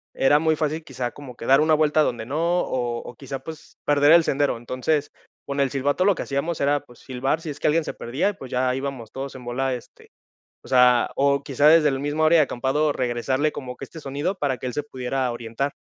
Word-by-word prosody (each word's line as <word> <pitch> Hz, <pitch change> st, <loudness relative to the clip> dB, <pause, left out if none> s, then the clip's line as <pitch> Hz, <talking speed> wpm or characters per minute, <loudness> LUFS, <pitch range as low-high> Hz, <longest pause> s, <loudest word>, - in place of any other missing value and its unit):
era 145 Hz, +2 st, +4 dB
muy 160 Hz, 0 st, +2 dB
fácil, 155 Hz, +1 st, -2 dB
quizá, 125 Hz, -3 st, -4 dB
como 135 Hz, -4 st, -11 dB
que 115 Hz, -, -9 dB
dar 135 Hz, +2 st, +5 dB
una 155 Hz, +1 st, +3 dB
vuelta 155 Hz, 0 st, +3 dB
donde 120 Hz, -4 st, -2 dB
no, 140 Hz, +6 st, -4 dB, 0.2 s
o 120 Hz, -2 st, -2 dB
o, -, -, -10 dB
quizá, 135 Hz, -1 st, -6 dB
pues, 160 Hz, +3 st, -11 dB
perder 145 Hz, +2 st, +5 dB
el 170 Hz, -1 st, +7 dB
sendero. 140 Hz, -2 st, +1 dB
Entonces, 130 Hz, +5 st, -2 dB, 0.3 s
con 140 Hz, 0 st, -4 dB
el 140 Hz, -, +2 dB
silbato 145 Hz, +5 st, 0 dB
lo 200 Hz, -1 st, +4 dB
que -, -, -5 dB
hacíamos 140 Hz, +4 st, -2 dB
era, 145 Hz, +1 st, +2 dB
pues, 120 Hz, -, -18 dB
silbar 135 Hz, +4 st, -2 dB
si 160 Hz, -, -6 dB
es 145 Hz, -, -7 dB
que -, -, 0 dB
alguien 160 Hz, +2 st, +2 dB
se -, -, -5 dB
perdía, 130 Hz, +12 st, -1 dB
y, -, -, -4 dB
pues, 135 Hz, -9 st, -10 dB
ya 125 Hz, 0 st, +1 dB
íbamos 135 Hz, -4 st, -5 dB
todos 135 Hz, 0 st, -6 dB
en 130 Hz, -, -10 dB
bola, 130 Hz, +2 st, -1 dB
este, 120 Hz, -, -11 dB, 0.5 s
o -, -, -14 dB
sea, 125 Hz, -1 st, +5 dB
o 140 Hz, 0 st, +2 dB
quizá 140 Hz, +1 st, +2 dB
desde 155 Hz, -2 st, +6 dB
la 135 Hz, -, -1 dB
misma 145 Hz, +3 st, +1 dB
área 165 Hz, +1 st, +5 dB
de 155 Hz, -, +6 dB
acampado 140 Hz, +4 st, 0 dB
regresarle 130 Hz, +4 st, 0 dB
como 125 Hz, -2 st, -7 dB
que -, -, -7 dB
este 165 Hz, -, -11 dB
sonido 145 Hz, +6 st, -3 dB
para 140 Hz, -7 st, -1 dB
que 130 Hz, -, -4 dB
él 125 Hz, -, -4 dB
se 150 Hz, -, -2 dB
pudiera 130 Hz, -2 st, -2 dB
orientar. 120 Hz, +4 st, -3 dB
140 Hz, 240 wpm, -23 LUFS, 125-150 Hz, 0.5 s, el